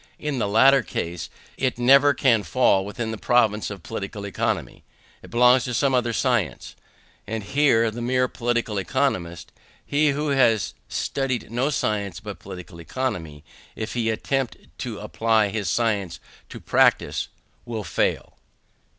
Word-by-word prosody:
In 150 -4 -3
the 105 - 0
latter 135 +7 +5
case 85 0 -5 0.3
it 130 -2 0
never 140 +4 +5
can 120 -5 +3
fall 100 -4 +2
within 110 +3 -4
the 110 - -6
province 110 -4 +2
of 100 -4 -8
Political 100 -1 -6
Economy; 100 - -3 0.4
it - - -13
belongs 125 +1 +5
to 125 - -3
some 135 +3 +2
other 120 -2 +1
science; 115 - -1 0.5
and 110 0 -4
here 115 -1 +3
the 120 +2 -6
mere 125 +1 +1
political 120 -4 -1
economist, 95 -8 -2 0.3
he 150 +1 +2
who 145 +2 -1
has 120 -6 +2 0.2
studied 135 -4 -2
no 125 +4 0
science 100 - -1
but 105 -2 -8
Political 90 -3 -10
Economy, 80 - -4 0.3
if 110 0 -5
he 115 -2 0
attempt 130 +3 -1 0.2
to - - -4
apply 110 -2 +1
his 105 -1 -2
science 100 -7 0 0.3
to - - -9
practice, - - +2 0.4
will 115 -3 -5
fail. - - -2
115 Hz, 145 wpm, -24 LUFS, 100-130 Hz, 0.5 s, latter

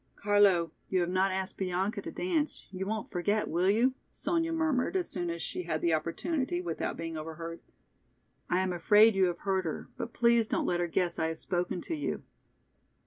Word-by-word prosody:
"Carlo, 200 -5 +4 0.2
you 185 - +2
have 175 0 0
not 190 +1 +2
asked 190 0 -3
Bianca 190 +3 -1
to - - -6
dance, 325 -5 -1
you 190 0 -4
won't 220 0 -3
forget, 205 +4 0
will 175 +4 +2
you?" 235 +6 +3 0.2
Sonya 330 -1 -1
murmured 320 -2 +1
as 365 -2 +1
soon 175 -4 -3
as 170 0 -3
she - - -3
had 165 -3 -2
the 170 0 +2
opportunity 175 - -1
without 170 -2 -3
being 165 -1 -4
overheard. 165 +2 -6 0.9
"I 180 - +2
am 185 -1 0
afraid 210 +6 +6
you 195 -1 +4
have 175 -1 -1
hurt 190 -1 0
her, 160 - -4
but 235 - -4
please 235 -1 +3
don't - - 0
let 175 - +1
her 175 - +1
guess 175 +1 0
I 160 - +2
have 160 0 -3
spoken 175 +1 -2
to - - -4
you." 295 - -3
190 Hz, 195 wpm, -30 LUFS, 175-220 Hz, 0.9 s, afraid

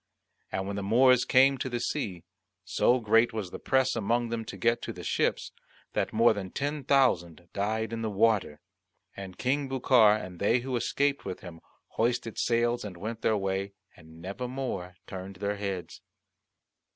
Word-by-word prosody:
And 95 - -2
when 100 +1 -4
the - - -2
Moors 125 +5 +4
came 135 +1 +4
to 130 - -2
the 120 -1 -2
sea, 100 - -3 0.4
so 125 +1 +2
great 115 +1 +3
was 105 -5 -4
the - - -7
press 130 -1 +1
among 115 +2 0
them 115 -1 -3
to - - -8
get 115 0 +1
to - - -5
the - - -9
ships, - - 0 0.4
that - - -1
more 115 +1 +4
than 100 -3 -5
ten 145 +6 -3
thousand 90 - +1
died 110 +3 -1
in 115 - -3
the 110 - -1
water. 100 -7 +1 0.5
And 95 -2 -8
King 135 +2 0
Bucar 125 -5 +5
and 90 -4 -7
they 115 +4 +2
who 130 0 -3
escaped 140 +4 0
with - - -6
him 85 -2 -10 0.3
hoisted 115 -1 -1
sails 120 0 +1
and 100 -4 -7
went 110 +5 -5
their 110 - +2
way, 95 0 -2 0.2
and 80 -1 -16
never 100 +8 -5
more 125 -9 -4
turned 95 +1 -8
their 100 +2 -2
heads. 95 -4 -5
110 Hz, 175 wpm, -28 LUFS, 95-125 Hz, 0.5 s, Bucar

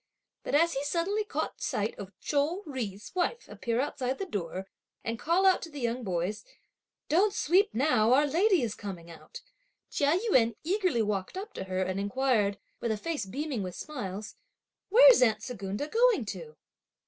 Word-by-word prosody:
But - - -2
as 335 +3 +4
he 275 - -2
suddenly 350 +8 0
caught 420 - -4
sight 210 +1 -1
of 200 0 -9
Chou 305 +7 0
Jui's 210 - -5
wife 370 +6 -1
appear 235 -1 -2
outside 270 -1 -1
the 390 - -3
door, 190 - -4 0.4
and 230 0 -3
call 345 +4 +2
out 380 -1 +5
to 330 - -7
the 290 -2 -8
young 240 0 -2
boys; 190 +2 -2 0.6
"Don't 390 +7 +3
sweep 390 +3 +3
now, 230 -3 +3
our 285 +3 +5
lady 350 - +3
is 220 -3 -1
coming 180 -6 -8
out," 450 - -11 0.5
Chia 290 +4 +2
Yün 230 - +4
eagerly 360 - +1
walked 205 - -2
up 410 +3 -6
to - - -5
her 185 0 -1
and 185 +1 -2
inquired, 205 -1 +1 0.2
with 235 - -1
a 215 - -1
face 300 -2 -3
beaming 270 +1 -3
with 185 -2 -5
smiles: 210 -8 -6 0.5
"Where's - - +8
aunt 220 -3 +3
Secunda 205 +2 -4
going 455 - +3
to?" 165 -6 -7
255 Hz, 170 wpm, -29 LUFS, 205-335 Hz, 0.6 s, Where's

